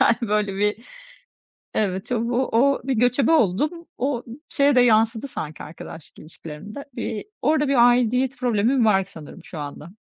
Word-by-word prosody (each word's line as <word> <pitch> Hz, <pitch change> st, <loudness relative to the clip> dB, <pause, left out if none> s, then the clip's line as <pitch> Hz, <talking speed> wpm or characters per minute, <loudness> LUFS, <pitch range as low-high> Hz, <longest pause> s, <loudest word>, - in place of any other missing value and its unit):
Yani, 230 Hz, -4 st, +2 dB
böyle, 210 Hz, -2 st, 0 dB
bir 210 Hz, +1 st, +1 dB, 1.0 s
evet, 190 Hz, +2 st, -1 dB
o 230 Hz, -, +1 dB
bu 245 Hz, +2 st, 0 dB
o 275 Hz, +4 st, +3 dB
bir 270 Hz, -, 0 dB
göçebe 245 Hz, +5 st, +2 dB
oldum, 300 Hz, -, +1 dB
o 250 Hz, -2 st, -1 dB, 0.2 s
şeye 285 Hz, -1 st, +3 dB
de 250 Hz, -, +6 dB
yansıdı 225 Hz, +1 st, +3 dB
sanki 155 Hz, -, -6 dB
arkadaşlık 160 Hz, 0 st, -11 dB
ilişkilerime 160 Hz, +5 st, -10 dB
de. 280 Hz, -, -7 dB
Bir 230 Hz, -3 st, -4 dB, 0.2 s
orada 295 Hz, +1 st, +2 dB
bir 245 Hz, -3 st, +6 dB
aidiyet 250 Hz, +2 st, +2 dB
problemim 240 Hz, +1 st, +2 dB
var 195 Hz, -3 st, +3 dB
sanırım 160 Hz, -5 st, -12 dB
şu 160 Hz, -, -9 dB
anda. 145 Hz, +2 st, -7 dB
235 Hz, 160 wpm, -23 LUFS, 200-265 Hz, 1.0 s, de